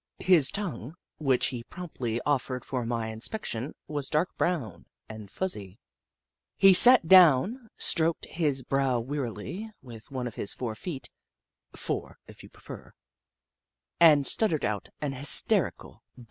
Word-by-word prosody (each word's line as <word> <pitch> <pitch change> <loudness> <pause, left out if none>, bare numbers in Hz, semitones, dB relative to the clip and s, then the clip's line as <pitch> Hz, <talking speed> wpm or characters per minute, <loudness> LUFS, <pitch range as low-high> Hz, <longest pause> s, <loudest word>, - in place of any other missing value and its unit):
His 170 -7 +3
tongue, 160 - -6 0.2
which 135 -4 0
he 120 - -6
promptly 125 -7 -6
offered 130 -3 -2
for 125 -3 -4
my 115 -2 -3
inspection, 120 - -5
was 145 -3 -5
dark 155 +4 -1
brown 145 - -3 0.2
and 110 -2 -11
fuzzy. 105 - -5 0.8
He 195 -1 +6
sat 240 -1 +8
down, 190 - +4
stroked 165 -1 -1
his 145 -6 -2
brow 135 -2 -1
wearily 140 - -6
with 115 -1 -13
one 130 -3 -5
of 120 - -6
his 100 - -5
four 120 -3 -5
feet 140 +4 -7 0.6
(fore, - - -4
if - - -15
you - - -15
prefer), - - -13 1.1
and 155 -4 +5
stuttered 165 - 0
out 105 -1 -4
an 145 -2 -3
hysterical 135 +1 +3 0.2
bleat. - - -15
140 Hz, 135 wpm, -26 LUFS, 120-170 Hz, 1.1 s, sat